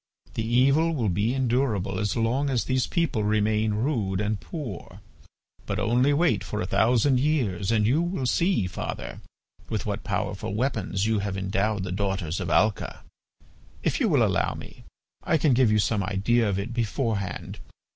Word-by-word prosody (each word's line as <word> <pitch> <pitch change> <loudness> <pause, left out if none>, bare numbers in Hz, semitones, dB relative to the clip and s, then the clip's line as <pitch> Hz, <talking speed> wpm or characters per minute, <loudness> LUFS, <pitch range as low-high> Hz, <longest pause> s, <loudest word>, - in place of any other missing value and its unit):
"The 110 - -2
evil 135 +8 +3
will 115 -7 0
be 105 +7 0
endurable 115 -7 0
as 105 -2 -1
long 125 +5 +1
as 125 -3 +1
these 130 -1 0
people 160 - 0
remain 105 0 +1
rude 105 -6 -1
and 105 0 -1
poor; 135 - -7 0.7
but - - -2
only 125 +5 +2
wait 160 +4 +2
for 105 - -4
a 90 - -1
thousand 120 +7 +3
years 115 - 0
and 110 -2 +3
you 135 +9 +3
will 175 -6 -2
see, 170 - +2
father, 90 - -5 0.5
with - - -2
what - - -3
powerful 100 - -3
weapons 110 -5 -1
you 110 -1 +1
have 100 -1 -3
endowed 95 +1 -1
the 95 - -4
daughters 95 -3 -2
of 90 -3 -3
Alca. 100 +6 +1 0.8
If - - 0
you - - +2
will - - +4
allow - - +1
me, - - -11 0.4
I 160 - +2
can 150 -3 +3
give 120 -3 +4
you 110 - +3
some 105 0 +1
idea 105 +4 +1
of 95 - -1
it 105 +5 -4
beforehand. 115 -5 -2
110 Hz, 170 wpm, -26 LUFS, 100-130 Hz, 0.8 s, will